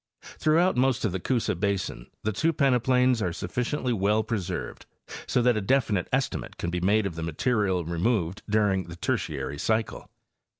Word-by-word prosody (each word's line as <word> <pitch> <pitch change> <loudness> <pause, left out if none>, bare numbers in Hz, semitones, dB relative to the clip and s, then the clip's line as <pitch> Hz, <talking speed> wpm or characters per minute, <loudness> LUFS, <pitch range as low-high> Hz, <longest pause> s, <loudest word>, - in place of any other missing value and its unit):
Throughout 170 +4 +3
most 130 -2 +2
of 105 - +1
the 95 - -2
Coosa 120 +5 0
basin 95 - -2 0.2
the 110 - 0
two 160 +11 +2
peneplains 125 -3 +3
are 90 - 0
sufficiently 125 - -2
well 105 +1 +2
pre 110 0 -1
served 90 0 -6 0.4
so 125 - +2
that 125 -1 +4
a 110 - 0
definite 110 -4 +1
estimate 135 0 -2
can 85 - -3
be 90 0 -2
made 105 +3 +3
of 95 - -2
the 80 - -6
material 95 +2 0
removed 85 +2 0
during 100 -3 +2
the 85 - -9
Tertiary 75 -4 -2
cycle. 110 +3 -1
105 Hz, 170 wpm, -27 LUFS, 90-125 Hz, 0.4 s, that